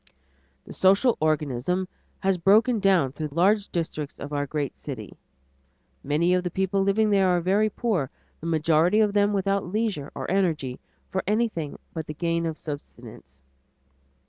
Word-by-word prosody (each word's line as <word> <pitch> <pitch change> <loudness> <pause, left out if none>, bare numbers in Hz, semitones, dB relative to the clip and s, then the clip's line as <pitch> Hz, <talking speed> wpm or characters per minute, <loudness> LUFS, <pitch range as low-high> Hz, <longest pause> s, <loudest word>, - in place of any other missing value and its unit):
The - - -10
social 195 +6 +4
organism 155 +3 0 0.3
has 190 -1 +1
broken 215 +6 +4
down 185 -9 +3
through 155 +2 -4
large 195 +6 +2
districts 155 -4 -4
of 145 +1 -7
our 145 0 -1
great 145 -1 -3
cities. - - -7 0.9
Many 160 +5 +2
of 180 0 +1
the 180 - -2
people 190 +2 0
living 210 +2 +2
there 195 -2 +4
are 180 -1 +3
very 200 +5 +2
poor, 195 - -1 0.3
the 165 - -6
majority 165 +4 +3
of 210 -2 +3
them 205 0 +3
without 195 0 0
leisure 205 -9 -2
or - - -4
energy 160 -10 0 0.3
for - - 0
anything 210 -8 -1 0.2
but 160 -2 -5
the 150 - -6
gain 170 +1 -1
of 160 -1 -4
subsistence. 140 - -9
180 Hz, 155 wpm, -25 LUFS, 155-200 Hz, 0.9 s, social